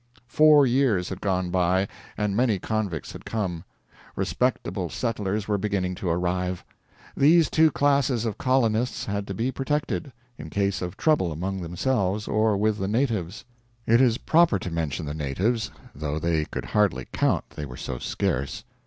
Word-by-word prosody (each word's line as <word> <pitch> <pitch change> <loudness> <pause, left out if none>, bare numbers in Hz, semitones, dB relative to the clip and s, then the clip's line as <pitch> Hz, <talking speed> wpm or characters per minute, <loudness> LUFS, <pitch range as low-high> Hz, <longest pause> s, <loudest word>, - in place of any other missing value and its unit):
Four 150 +3 +6
years 120 -8 +2
had 95 0 -6
gone 95 -3 0
by, 90 +2 +2 0.3
and 105 -2 0
many 115 -3 +2
convicts 100 -5 -3
had - - -10
come. 90 -7 -3 0.5
Respectable - - -1
settlers 105 -2 -2
were 105 -1 0
beginning 95 -3 -1
to 90 0 -4
arrive. 90 +1 -1 0.5
These 160 +3 +5
two 160 0 +5
classes 140 -5 +2
of 110 -3 -3
colonists 125 -2 +1
had 100 0 -3
to 95 - -4
be 120 +6 -1
protected, 135 -5 -2 0.3
in 80 - -7
case 100 +2 0
of 90 +1 -5
trouble 150 - +2
among 95 +5 -3
themselves 100 +3 -1
or 110 -1 +2
with 105 +1 +1
the 95 - -1
natives. 110 -6 -1 0.4
It 115 +3 +5
is 120 -3 +4
proper 165 -7 +3
to 90 -1 -6
mention 80 -1 -2
the 75 - -4
natives, 100 - -1 0.2
though 75 +1 -3
they 80 -1 0
could - - -6
hardly 100 -12 +1
count - - 0
they 75 - -6
were 60 - -9
so 60 - -5
scarce. 70 +2 -2
100 Hz, 160 wpm, -25 LUFS, 90-120 Hz, 0.5 s, Four